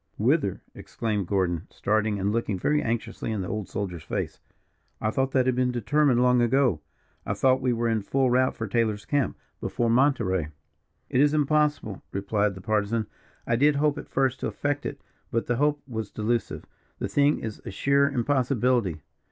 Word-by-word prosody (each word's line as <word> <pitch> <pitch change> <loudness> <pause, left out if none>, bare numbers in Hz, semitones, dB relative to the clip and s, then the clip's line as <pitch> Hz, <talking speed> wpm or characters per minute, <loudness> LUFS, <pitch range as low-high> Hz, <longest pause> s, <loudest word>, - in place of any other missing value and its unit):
"Whither," - - +1
exclaimed 105 -5 -3
Gordon, 90 -4 0
starting, 105 0 0
and 100 +2 0
looking 110 -3 -1
very 150 +11 +1
anxiously 115 -1 -3
in 105 -3 -2
the 90 - -4
old 105 -1 -4
soldier's 90 -5 -4
face. - - -4 0.6
"I 110 - 0
thought 135 +3 0
that 130 -2 +3
had 130 - +2
been 125 0 +1
determined 125 +2 +2
long 125 -1 +4
ago. 120 - +2 0.4
I - - -2
thought 130 0 +3
we 125 -1 +1
were 120 0 0
in 110 -2 +1
full 130 +5 +1
route 130 +1 +2
for 115 - -4
Taylor's 110 -1 0
camp 145 -3 0 0.2
before 120 -1 -1
Monterey." 115 - +2 0.6
"It 130 - +3
is 150 +1 +4
impossible," 150 -8 +1
replied 100 0 0
the 95 - -9
Partisan. 110 +2 0 0.4
"I 115 - +1
did 145 +4 +4
hope 145 0 +1
at - - -10
first 130 -1 +1
to - - -2
effect 145 0 -2
it, - - -6 0.3
but 115 - -1
the 120 - 0
hope 145 +1 +1
was 110 -5 -4
delusive 115 +2 -2 0.3
the - - -2
thing 145 +1 +3
is 110 -2 -6
a - - -6
sheer 140 +8 +2
impossibility. 125 - +1
120 Hz, 180 wpm, -26 LUFS, 105-135 Hz, 0.6 s, long